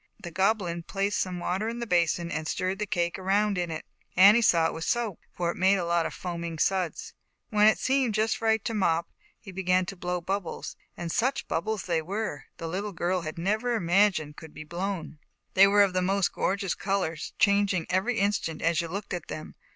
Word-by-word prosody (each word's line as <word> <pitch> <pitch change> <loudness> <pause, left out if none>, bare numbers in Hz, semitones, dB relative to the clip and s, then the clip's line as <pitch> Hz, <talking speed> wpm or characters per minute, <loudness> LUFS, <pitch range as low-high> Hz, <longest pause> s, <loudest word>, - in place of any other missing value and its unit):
The 175 - -8
Goblin 190 -2 +1
placed 195 +4 -1
some 185 -1 -2
water 190 +5 -1
in 235 - -5
the 240 - -3
basin 170 -3 +1
and 155 0 -3
stirred 185 +3 -2
the 210 - -2
cake 175 -1 -1
around 200 +2 +1
in 175 -1 -1
it. 160 -1 -5 0.3
Annie 205 +5 +8
saw 170 -7 +4
it - - 0
was 160 - -5
soap, 235 -7 -1
for 170 -1 -1
it - - -10
made 190 +2 +4
a 180 - -2
lot 170 -1 +1
of - - -8
foaming 170 -2 -5
suds. 185 +1 -1 0.4
When 210 0 +5
it 215 -6 +5
seemed 260 0 +1
just 225 +3 0
right 220 -1 +2
to 230 - -1
Mop, 170 -5 +1 0.3
he 200 - -11
began 185 0 +1
to 195 - -6
blow 180 0 -2
bubbles, 190 +1 -4 0.2
and 170 -1 -4
such 260 +9 0
bub 165 - -1
bles 220 -3 -2
as - - -12
they 170 -3 0
were, 195 -2 -4
the 165 - -5
little 195 +5 -3
girl 180 +2 0
had 155 0 -6
never 215 +7 0
imagined 175 -5 +2
could 160 -2 -11
be 155 - -7
blown. 175 -1 -4
o - - -37 0.3
They 195 +1 +7
were 205 +1 +6
of 195 -2 +1
the 185 - +1
most 195 +1 +1
gorgeous 195 -1 0
uors, 190 -6 -2
changing 200 -4 +3
every 195 +6 0
instant 200 -6 0
as 165 0 +2
you 170 - -4
looked 195 +5 -5
at 175 -3 -4
them. 155 - -7
185 Hz, 220 wpm, -27 LUFS, 170-205 Hz, 0.4 s, Annie